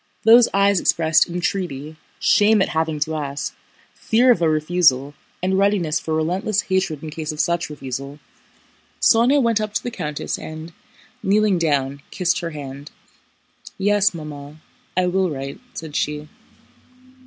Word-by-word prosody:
Those 230 +2 +7
eyes 200 -1 +3
expressed 160 0 +3
entreaty, 170 -4 -3 0.2
shame 210 +1 +4
at - - -3
having 160 -1 -1
to 160 +1 0
ask, 140 -1 -4 0.4
fear 245 +3 +3
of 185 - +2
a 165 - +3
refusal, 155 -3 +2 0.3
and 190 +1 +1
readiness 190 -6 +1
for 160 - -3
relentless 185 +6 0
hatred 185 -6 -1
in 155 - -6
case 155 0 -4
of 155 - -9
such 170 0 0
refusal. 140 -1 -6 0.8
Sónya 245 +5 +4
went 230 -4 +2
up 215 0 -4
to - - 0
the 245 - -4
countess 150 -8 -4
and, 155 +2 -8 0.5
kneeling 205 -2 +2
down, 140 -3 0
kissed 180 -1 0
her 170 - -4
hand. 145 -2 -8 0.9
"Yes, 205 +1 +3
Mamma, 150 -2 -9 0.4
I 185 - +3
will 185 +1 +1
write," 135 -2 -6 0.2
said 155 -2 -7
she. 150 0 -2
165 Hz, 145 wpm, -21 LUFS, 150-195 Hz, 0.9 s, Those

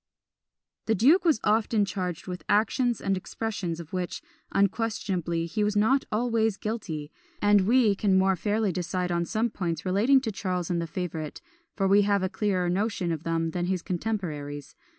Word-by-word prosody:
The 220 - +3
duke 295 - +5
was 320 -9 +3
often 215 -1 +2
charged 180 -4 -4
with 180 -1 -6
actions 235 +3 +2
and 195 - 0
with - - -3
expressions 195 -8 -4
of 165 0 -10
which, 180 -1 -3 0.3
unquestionably, 195 -5 0
he 210 +5 -1
was 210 0 0
not 240 +7 +3
always 225 -2 +1
guilty; 165 -9 -4 0.3
and 205 -2 +4
we 235 -3 +4
can 195 -1 +2
more 190 0 +3
fairly 210 +2 0
decide 180 +1 -2
on 170 0 0
some 225 +4 -1
points 170 -4 -3
relating 215 +9 +4
to 230 -4 -2
Charles 185 -3 -2
and 170 -1 0
the 165 - -3
favourite, 160 -3 -5 0.4
for 195 -2 +1
we 200 +2 +5
have 200 -1 +2
a 185 - 0
clearer 190 -3 0
notion 190 -1 0
of 160 -2 -3
them 165 0 -1
than 175 +1 -2
his 185 -2 -1
contemporaries. 160 -8 -4
195 Hz, 175 wpm, -27 LUFS, 175-220 Hz, 0.4 s, duke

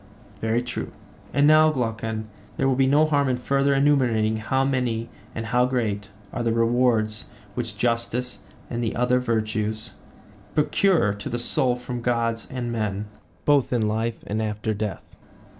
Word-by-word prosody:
Very 115 +2 0
true. 125 - -5 0.4
And 140 0 +3
now, 155 +1 +7
Glaucon, 115 -5 -2 0.3
there 135 - +2
will 135 - +3
be 135 0 +3
no 145 +3 +5
harm 145 -3 +2
in 125 - +1
further 140 +2 +2
enumerating 125 -6 +3
how 130 +5 0
many 125 -4 -1 0.3
and 110 - -3
how 125 +3 +2
great 105 -6 -1 0.2
are 120 - -2
the 115 -1 +1
rewards 115 -2 +1 0.2
which 115 -2 -4
justice 120 +1 -1 0.3
and 120 0 -3
the 115 - -1
other 125 +1 +2
virtues 110 -2 -2 0.6
procure 155 - +3
to 100 0 -6
the 120 - -2
soul 125 +1 +1
from 125 0 -5
gods 115 -1 0
and 125 -2 -3
men, 105 -2 -2 0.4
both 145 -3 +3
in 115 -4 +2
life 110 +2 -2
and 105 +2 -2
after 110 0 -2
death. 105 -2 -5
120 Hz, 160 wpm, -24 LUFS, 110-130 Hz, 0.6 s, now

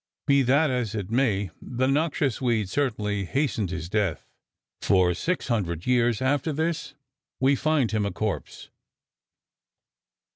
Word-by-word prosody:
Be 140 -2 +4
that 140 +4 +3
as 120 -4 -2
it 105 -1 -4
may, 105 -7 +1
the 125 +1 -1
noxious 140 -2 0
weed 115 -6 +1
certainly 105 -7 -1
hastened 115 - -1
his 85 -2 -4
death, 100 -4 -1 0.6
for 90 -2 +3
600 100 - -2
years 120 -2 +2
after 145 +4 +1
this 160 -1 -2 0.4
we 135 +2 +4
find 150 -4 +1
him 105 -2 0
a - - -3
corpse! 105 +1 -4
120 Hz, 125 wpm, -26 LUFS, 105-140 Hz, 0.6 s, Be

